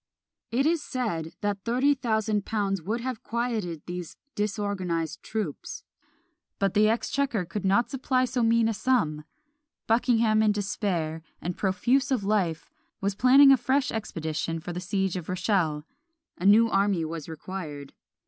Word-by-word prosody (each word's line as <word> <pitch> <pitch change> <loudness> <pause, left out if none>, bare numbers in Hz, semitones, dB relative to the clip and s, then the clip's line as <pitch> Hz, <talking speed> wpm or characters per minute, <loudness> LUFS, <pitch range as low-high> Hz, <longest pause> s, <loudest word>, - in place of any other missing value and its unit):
It 260 +4 +1
is 330 0 +2
said 190 - -3
that 205 -2 -2
thirty 255 +5 +3
thousand 220 -5 0
pounds 195 -4 -1
would 220 +8 -2
have 255 -2 -4
quieted 225 - -3
these 175 -2 -6 0.2
disorganised 195 -6 -2
troops; 210 -10 -5 0.7
but 195 -2 0
the 215 +1 +4
exchequer 235 -2 0
could 190 +4 -5
not 200 +5 +2
supply 255 -1 +1
so 250 0 -1
mean 230 0 +3
a 225 - 0
sum. 200 -10 0 0.6
Buckingham 225 -1 +3
in 215 -1 +3
despair, 185 -6 -2 0.2
and 175 +1 -4
profuse 240 +8 +1
of 255 -7 0
life, 195 -6 0 0.3
was 200 +1 -1
planning 265 +6 +7
a 270 - +7
fresh 270 +2 +1
expedition 165 -6 -3
for 175 +2 -6
the 175 - -4
siege 190 0 -1
of 180 -3 -5
Rochelle; 180 -5 0 0.5
a 185 - -1
new 220 +3 +7
army 195 -5 +1
was 160 0 -6
required. 155 -4 -7
205 Hz, 150 wpm, -27 LUFS, 175-235 Hz, 0.7 s, planning